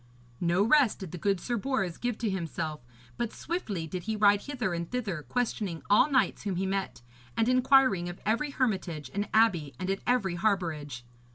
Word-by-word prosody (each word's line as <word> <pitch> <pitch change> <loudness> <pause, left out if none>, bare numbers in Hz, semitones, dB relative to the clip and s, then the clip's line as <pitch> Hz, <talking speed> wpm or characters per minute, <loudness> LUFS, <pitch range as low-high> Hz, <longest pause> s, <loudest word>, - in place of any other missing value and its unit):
No 175 +3 +2
rest 260 0 +4
did 190 -5 -8
the 180 - -6
good 195 +1 +1
Sir 240 +6 -2
Bors 210 -8 -1
give 245 -2 -2
to 225 - -1
himself, 165 -4 -3 0.4
but 235 -2 -2
swiftly 220 - -3
did 175 +2 -6
he 220 0 -1
ride 205 -1 +4
hither 245 -10 -3
and 170 0 -3
thither 215 -10 -3
questioning 210 -4 -2
all 235 +8 +6
knights 265 -3 +2
whom 200 -3 -2
he 190 +2 -1
met, 190 -9 -3 0.3
and 225 - +2
inquiring 255 -8 +4
of 175 - -8
every 230 +8 +1
hermitage 190 - -2
and 205 +1 -2
abbey 180 -11 +3
and 185 +1 -1
at 195 - -2
every 235 -7 +2
harbourage. 165 - -1
200 Hz, 185 wpm, -29 LUFS, 175-240 Hz, 0.4 s, all